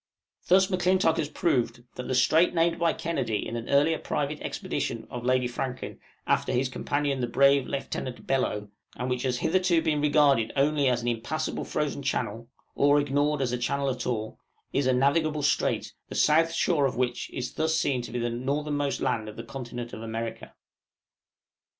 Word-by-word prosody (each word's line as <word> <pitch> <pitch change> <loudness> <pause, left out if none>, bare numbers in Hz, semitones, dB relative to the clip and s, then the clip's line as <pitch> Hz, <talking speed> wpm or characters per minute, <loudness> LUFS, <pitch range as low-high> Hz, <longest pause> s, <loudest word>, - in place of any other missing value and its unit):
Thus, 190 +1 +5
M'Clintock 185 -2 +2
has 150 - -1
proved, 125 -9 0
that 125 - -6
the 130 - 0
strait 160 +8 +4
named 165 0 +2
by 170 -1 +3
Kennedy 115 -10 -2
in 115 - -5
an 115 0 -5
earlier 150 +3 +3
private 150 +1 -2
expedition - - -3
of 120 -1 -5
Lady 125 0 +2
Franklin 125 +1 -5 0.3
after - - +1
his 130 +1 +1
companion 140 0 -1
the 120 - 0
brave 140 +2 +4
Lieutenant 135 -2 -4
Bellot, 105 -6 -1 0.3
and 125 +1 -3
which 125 -1 -1
has 125 -1 0
hitherto 180 +4 +2
been 155 -2 0
regarded 145 -6 +3
only 145 0 +2
as 120 -1 0
an - - -3
impassable 120 +6 -2
frozen 150 -1 -2
channel, 115 -4 -2 0.3
or 145 +1 +4
ignored 145 0 +1
as 125 - -1
a 125 - -2
channel 140 +2 0
at 125 -1 -4
all, 110 -3 -3 0.3
is 140 -2 +1
a 130 - +4
navigable 150 +3 +2
strait, 145 - 0 0.2
the - - -7
south 165 +2 +4
shore 165 -3 +2
of 130 - -4
which 125 -1 -1
is 125 -1 -5
thus 160 0 0
seen 135 -5 +1
to 120 - -8
be 125 - -3
the 120 0 -1
northernmost 145 +3 -1
land 110 -3 -1
of 105 - -10
the 115 - -5
continent 120 -1 -7
of 110 - -7
America. 115 0 -5
135 Hz, 180 wpm, -27 LUFS, 120-150 Hz, 0.3 s, Thus